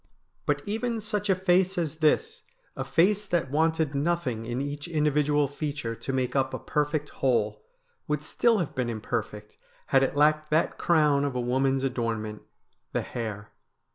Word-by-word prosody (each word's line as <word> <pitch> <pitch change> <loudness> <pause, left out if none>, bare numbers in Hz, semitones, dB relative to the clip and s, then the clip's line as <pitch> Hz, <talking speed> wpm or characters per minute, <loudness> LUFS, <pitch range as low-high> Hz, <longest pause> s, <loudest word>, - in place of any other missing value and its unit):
But - - +1
even 225 +2 -2
such 210 -1 -2
a 190 - +5
face 185 +1 +2
as 160 -2 -1
this, 155 -2 +1 0.3
a 135 - -3
face 185 +10 +2
that 170 -7 0
wanted 160 0 +1
nothing 140 -7 -1
in 120 +1 -2
each 145 +2 -4
individual 150 -2 +2
feature 145 -4 -4
to 125 - -5
make 130 -1 -1
up 130 -1 +1
a - - -2
perfect 150 0 -1
whole, 105 -5 +1 0.4
would 150 0 -1
still 230 +8 +2
have 170 -6 -2
been 125 -4 -1
imperfect 105 -1 -4 0.4
had 135 - +6
it 135 +1 0
lacked 150 +1 +3
that 155 +2 +1
crown 150 -4 +3
of 140 -3 -2
a - - 0
woman's 130 +2 +1
adornment 115 -5 -2 0.3
— - - -45
the - - +1
hair. 105 -3 -5
145 Hz, 170 wpm, -27 LUFS, 130-165 Hz, 0.4 s, had